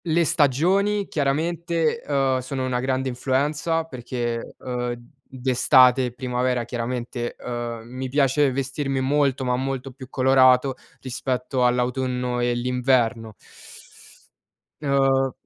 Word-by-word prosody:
Le 170 0 +2
stagioni 185 +9 +2
chiaramente, 165 +6 -1
uhm, 135 -2 +1
sono 130 +1 -4
una 125 -1 -1
grande 130 +1 -1
influenza 145 +6 0
perché, 120 -5 -5
uhm, 125 -1 -3 0.3
d'estate 130 0 +4
e 125 - -4
primavera 125 -1 -1
chiaramente, 120 0 -4
uhm, 120 -1 -5
mi 130 +2 -6
piace 140 +1 +2
vestirmi 135 +1 -2
molto, 135 -1 +1
ma 125 0 +1
molto 135 0 -3
più 130 0 -12
colorato, 130 0 +4 0.3
rispetto 130 0 -2
all'autunno 125 0 -1
e 120 0 +1
l'inverno. 120 -2 0 1.5
Uhm 135 -2 +2
130 Hz, 110 wpm, -23 LUFS, 125-140 Hz, 1.5 s, d'estate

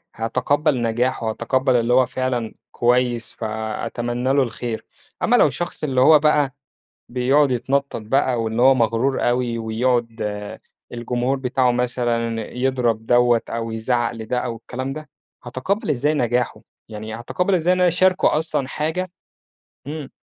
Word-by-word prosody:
هاتقبَّل 125 +4 0
نجاحه، 115 0 0
هاتقبَّل 130 +3 0
اللي 120 0 +2
هو 130 0 +5
فعلًا 125 -4 -2 0.2
كويِس، 120 -1 +1
فأتمنَّى 115 +3 -3
له 140 -1 +4
الخير. 115 -1 -5 0.4
أمَّا - - +4
لو - - +6
الشخص 175 -2 -4
اللي 130 -4 +1
هو 155 +3 +7
بقى 150 -3 +2 0.6
بيقعد 130 +3 +2
يتنطَّط 135 0 -1
بقى، 125 +1 +1
واللي 110 +1 -1
هو 135 +2 +7
مغرور 120 +3 +1
أوي، 120 -1 0
ويقعد 115 0 -1 0.7
الجمهور 120 +2 -1
بتاعه 125 -1 +1
مثلًا 120 -2 -1 0.2
يضرب 125 -4 0
دوّة 120 -1 +4
أو 115 0 -3
يزعق 120 +2 0
لده 115 +2 -3
أو 115 - -3
الكلام 125 +3 -6
ده، 155 +2 -7 0.3
هاتقبَّل 130 - -2
إزاي 145 +3 +1
نجاحه 125 -3 0 0.3
يعني، 110 0 -7
هاتقبَّل 180 - -1
إزاي 175 +1 +2
إن 185 - -1
أنا 180 - +5
اشارِكه 185 -2 +3
أصلًا 155 -4 -1
حاجة 160 +6 -2 0.8
إمم. 150 -2 -6
125 Hz, 140 wpm, -21 LUFS, 115-135 Hz, 0.8 s, هو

